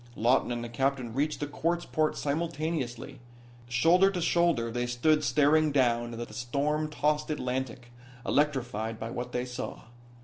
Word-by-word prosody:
Lawton 120 +3 +2
and 120 0 -3
the - - -4
captain 130 0 -1
reached 145 +4 0
the - - 0
quartz 170 +4 -1
port 155 -1 0
simultaneously. 145 -4 -3 0.5
Shoulder 165 +10 +5
to 190 -2 -3
shoulder 170 -9 +2
they 120 +1 -1
stood 150 +6 +2
staring 150 +1 +3
down 120 -3 +1
at 120 - -4
the - - -13
storm 140 +7 -1
tossed 150 0 0
Atlantic, 125 -3 -3 0.3
electrified 120 -7 0
by 115 +1 -5
what 125 0 -5
they 125 0 -2
saw. 125 0 -6
135 Hz, 150 wpm, -29 LUFS, 120-155 Hz, 0.5 s, Shoulder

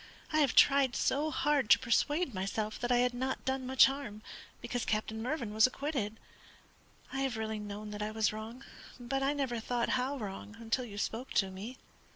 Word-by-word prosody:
I 310 - +4
have 285 -4 +3
tried 275 -3 +5
so 295 +3 +1
hard 295 -6 +1
to - - +9
persuade 290 +5 +1
myself 210 +3 -3
that 240 +1 -1
I 245 - +5
had 245 0 +2
not 260 +2 -3
done 265 -1 -1
much 260 0 +7
harm, 240 -6 -4 0.4
because 245 -1 -3
Captain 220 +1 -1
Mervyn 240 -4 -2
was 220 +2 +6
acquitted. 255 -6 -3 0.9
I 270 - -2
have 265 -4 -1
really 220 -1 -3
known 210 0 -6
that 210 0 -6
I 210 - -1
was 215 0 +1
wrong, 225 +4 -7 0.4
but 260 +3 -2
I 275 +2 +2
never 265 -5 -1
thought 235 +1 -1
how 260 +2 0
wrong 210 -1 -7
until 230 +2 -1
you 205 -3 -9
spoke 225 +4 -3
to 195 -2 +2
me." 210 +7 -7
240 Hz, 195 wpm, -32 LUFS, 215-270 Hz, 0.9 s, to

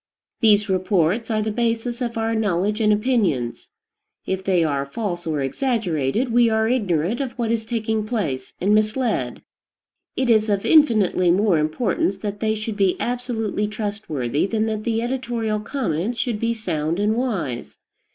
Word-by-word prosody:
These 210 -2 +4
reports 185 +3 +1
are 215 -1 +1
the 215 - -1
basis 235 +2 -1
of 235 -2 -2
our 225 0 0
knowledge 210 0 0
and 210 -1 +4
opinions. 210 - 0 0.6
If 190 0 -2
they 185 -3 +2
are 140 -3 0
false 175 +3 -4
or 155 -3 -1
exaggerated, 210 - -1
we 240 -1 +5
are 220 0 +2
ignorant 205 - 0
of 260 -3 -3
what 235 -2 -2
is 225 -1 -1
taking 220 -2 -1
place, 155 - -3
and 200 +3 +2
misled. 215 +4 0 0.7
It 260 - 0
is 220 -2 +3
of 200 -1 0
infinitely 215 - +4
more 185 -1 +3
importance 190 +5 0
that 205 0 -5
they 220 -1 0
should 215 0 -4
be 195 -3 +2
absolutely 235 -4 -2
trustworthy 205 - -2
than 220 +1 0
that 215 -1 -3
the 230 -1 0
editorial 240 -4 -2
comments 225 - -2
should 230 -4 -1
be 230 +1 0
sound 165 -6 -2
and 210 +2 +2
wise. 190 - -3
215 Hz, 160 wpm, -22 LUFS, 185-230 Hz, 0.7 s, we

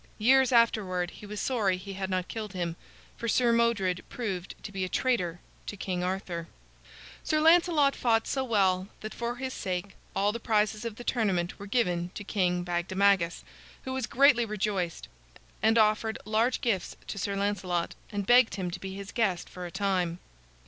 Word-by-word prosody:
Years 260 +4 +5
afterward 195 -7 +2
he 210 - -11
was 210 0 -5
sorry 205 -8 +1
he 195 +2 -8
had 190 0 -4
not 185 -1 -1
killed 215 -3 -5
him, 170 -2 -2 0.4
for 235 - -4
Sir 235 +2 +3
Modred 205 -6 +1
proved 195 -7 -4
to 200 - -6
be 190 -1 -3
a 185 - -2
traitor 180 -10 0 0.3
to 205 - -5
King 180 -2 -2
Arthur. 180 -2 -3 0.8
Sir 310 - +1
Lancelot 320 -3 +5
fought 225 -2 +2
so 265 - -1
well 195 -6 +2
that, 215 - -6
for 235 0 -3
his 260 +1 -4
sake, 185 +1 -3 0.2
all 200 +1 +2
the 235 - -5
prizes 215 -1 +1
of 230 -2 -4
the 240 - -9
tournament 195 -9 0
were 200 - -8
given 180 -6 0
to - - -5
King 180 -3 0
Bagdemagus, 180 +1 +1 0.4
who 260 - -4
was 260 0 -2
greatly 270 -2 +5
rejoiced, 200 -5 -2 0.5
and 225 +1 +4
offered 220 0 +3
large 225 +4 +1
gifts 215 -9 -1
to 200 - -5
Sir 200 +1 -2
Lancelot, 190 -4 -1 0.2
and 205 -2 -2
begged 245 +1 +5
him 185 -3 -3
to 180 - -6
be 190 0 -6
his 200 0 -7
guest 195 -7 0
for 180 -1 -7
a - - -10
time. 185 -3 0
200 Hz, 180 wpm, -29 LUFS, 185-235 Hz, 0.8 s, Years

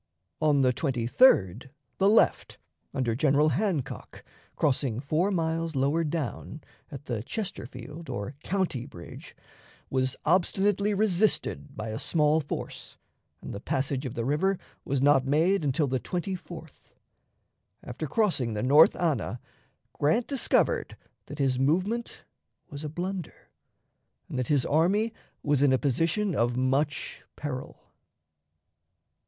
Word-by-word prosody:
On 150 -2 +3
the 130 -1 +3
23d 125 - +3 0.3
the 195 - +5
left, 220 - +2 0.3
under 125 -4 -1
General 145 +4 +3
Hancock, 175 - -3 0.3
crossing 130 -5 0
four 155 +8 0
miles 165 -3 -1
lower 140 +5 +1
down, 155 -1 -4 0.3
at 145 -2 -9
the 115 -4 -3
Chesterfield 150 - -7
or 100 +6 -4
County 175 -10 -1
Bridge, 85 -12 -11 0.6
was 130 -1 0
obstinately 200 +4 +2
resisted 195 -7 0
by 110 +1 -4
a 110 - -4
small 155 -1 +2
force, 145 - -6 0.5
and - - -6
the 100 - -5
passage 135 +3 -2
of 125 - -7
the 115 - -2
river 180 +8 +1 0.3
was 135 -1 -1
not 140 -2 +5
made 165 +6 +2
until 145 +2 +1
the 130 -1 -1
24th. 175 -1 -6 1.0
After 125 +6 -5
crossing 140 - +1
the 105 - -2
North 145 +5 +6
Anna, 155 -7 -1 0.5
Grant 190 +12 +1
discovered 275 -3 +1 0.3
that 145 - -8
his 135 -3 +1
movement 185 - 0 0.5
was 145 +1 -7
a 150 - -3
blunder, 180 +2 -6 0.8
and 130 - -4
that 125 - -1
his 145 -4 +2
army 195 +9 +2 0.3
was 145 -2 +2
in 140 -2 +5
a 130 - +4
position 165 - 0
of 120 -1 +1
much 135 +3 -1
peril. 135 -3 -6
150 Hz, 125 wpm, -27 LUFS, 130-175 Hz, 1.0 s, North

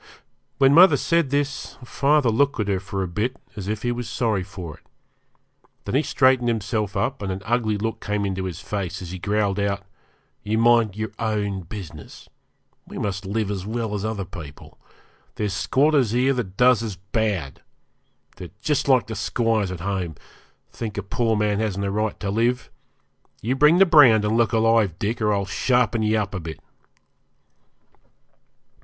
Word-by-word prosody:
When 135 0 +5
mother 170 -2 +7
said 165 0 +1
this, 140 0 -2
father 140 0 +2
looked 140 +3 +1
at 105 - 0
her 100 -2 0
for 95 +1 -4
a - - -3
bit 110 +9 -2 0.2
as 100 -2 -6
if 105 0 -3
he 120 - 0
was 120 0 -4
sorry 110 -5 0
for 90 -4 -8
it; - - -27 1.0
then - - -4
he 135 - +4
straightened 130 -4 +3
himself 105 -2 -2
up, 135 -2 -1
and 100 -2 -3
an 95 +1 -5
ugly 115 -2 0
look 110 +2 -3
came 105 -1 -1
into 95 -1 -2
his 90 -2 -5
face 95 -2 -4
as 85 - -7
he 95 - -6
growled 105 0 0
out 100 -1 -1 0.6
'You 105 +1 -1
mind 115 -3 +4
your 110 -1 -4
own 105 -3 -1
business; 90 0 -10 0.6
we - - -9
must 100 -1 -3
live 105 0 -1
as 95 -2 -3
well 110 -1 -3
as 105 -1 -3
other 110 -3 -3
people. 75 -6 -11 0.6
There's 105 -2 -2
squatters 140 +3 +2
here 125 +4 +2
that 105 -7 -4
does 125 -2 +5
as 110 -4 -4
bad. 95 - -3 0.8
They're 90 - -8
just 150 +5 0
like 130 -3 +4
the 110 - -6
squires 110 0 0
at 90 -2 -6
home; 95 -4 -3 0.6
think 110 -3 -6
a 100 - -2
poor 115 +3 0
man 105 -1 +1
hasn't 100 -2 -1
a 100 - -1
right 105 +1 -2
to 100 - -2
live. 120 +4 0 0.7
You 125 +4 0
bring 150 +5 +5
the 195 - +7
brand 130 - +6
and 105 +1 +1
look 115 -1 +2
alive, 115 -5 +2
Dick, 110 +2 -2
or 105 -1 +2
I'll 100 -1 0
sharpen 125 +3 +1
ye 110 0 +2
up 105 -1 -1
a 95 - -3
bit.' 80 -1 -7
110 Hz, 180 wpm, -23 LUFS, 100-120 Hz, 1.0 s, mother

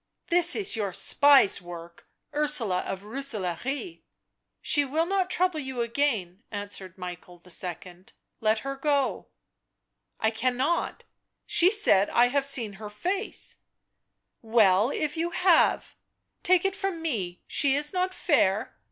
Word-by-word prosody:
" - - -54
This 350 0 +5
is 400 - +1
your 205 -4 -3
spy's 275 0 +5
work, 170 -1 -11 0.3
Ursula 290 -11 +1
of 190 0 -5
Rooselaare." 255 - -4 0.3
" - - -56
She 290 - +3
will 305 +4 -1
not 375 0 -1
trouble 365 -3 0
you 265 -3 -4
again," 230 -7 -2
answered 200 -3 -7
Michael 180 -1 -9
II., 180 0 -5 0.2
" - - -50
let 215 0 +2
her 275 0 -5
go." 280 -1 -1 0.5
" - - -50
I 220 - +1
cannot 255 +8 -1 0.2
— - - -55
she 350 - +4
said 380 - +4
I 245 +1 +3
had 275 +1 0
seen 235 -7 0
her 210 - -7
face 370 - -3 0.3
" - - -54
" - - -54 0.2
Well, 200 +1 +5
if 300 +2 -3
you 335 +1 -1
have? 355 -1 +2 0.3
— - - -54
take 365 0 +3
it 390 0 0
from 385 -3 -3
me 190 - -4
she 275 -2 +2
is 295 +3 0
not 370 0 -1
fair." 220 - 0
265 Hz, 155 wpm, -26 LUFS, 200-320 Hz, 0.5 s, This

